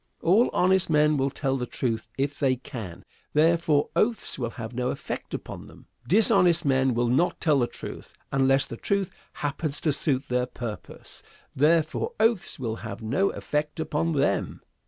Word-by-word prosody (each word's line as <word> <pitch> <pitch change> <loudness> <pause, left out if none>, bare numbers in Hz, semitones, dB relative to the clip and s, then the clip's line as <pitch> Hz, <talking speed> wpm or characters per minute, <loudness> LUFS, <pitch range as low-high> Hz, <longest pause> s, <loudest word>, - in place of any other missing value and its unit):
All 205 +9 +4
honest 185 0 +2
men 150 -1 +4
will 135 -1 +1
tell 135 0 -1
the 125 -1 -3
truth 115 -3 -3
if 140 +1 -2
they 135 -3 +2
can; 100 -8 -8 0.3
therefore, 155 -1 +3
oaths 225 - 0
will 120 -2 -1
have 115 0 -7
no 125 +1 -1
effect - - -5
upon - - -8
them. - - -16 0.2
Dishonest 180 -5 +4
men 130 -2 +2
will 120 +1 +1
not 130 +9 +1
tell 150 -4 +3
the 120 - +2
truth - - -9 0.2
unless 135 0 +3
the 115 - -8
truth 200 +4 -1 0.2
happens 145 0 -3
to 155 -4 +1
suit 135 -2 0
their 125 0 0
purpose; 115 -4 -8 0.3
therefore, 160 - +2
oaths 225 -4 +2
will 115 -4 -3
have - - -7
no 140 - +1
effect 150 +1 -3
upon 160 +1 -1
them. 145 0 0
145 Hz, 165 wpm, -26 LUFS, 125-165 Hz, 0.3 s, All